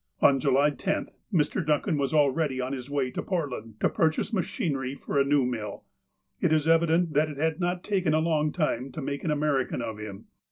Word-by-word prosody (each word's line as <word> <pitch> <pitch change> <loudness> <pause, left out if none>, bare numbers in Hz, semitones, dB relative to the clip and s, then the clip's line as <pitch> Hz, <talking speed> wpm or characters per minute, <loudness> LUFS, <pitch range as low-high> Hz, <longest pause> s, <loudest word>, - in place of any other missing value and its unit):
On 135 -1 +5
July 140 +2 +3
10th, 195 +7 -2 0.2
Mr. 165 0 +1
Duncan 155 +3 +1
was 140 -2 0
already 145 -2 +2
on 130 +1 -2
his 130 0 -6
way 140 -3 -1
to - - -3
Portland 130 - -3
to - - +4
purchase 160 +7 0
machinery 140 -8 -1
for 140 +1 -2
a - - +5
new 140 -1 +2
mill. 110 -5 -4 0.6
It - - +1
is 155 0 +2
evident 165 0 +3
that 150 +2 +2
it 145 - -7
had 160 +2 0
not 175 0 -1
taken 185 -6 +1
a - - +3
long 155 -2 +1
time 135 -6 -1
to - - -6
make 140 +1 -4
an 165 - -1
American 145 -4 0
of 110 -2 -5
him. 105 -2 -8
145 Hz, 205 wpm, -27 LUFS, 135-160 Hz, 0.6 s, On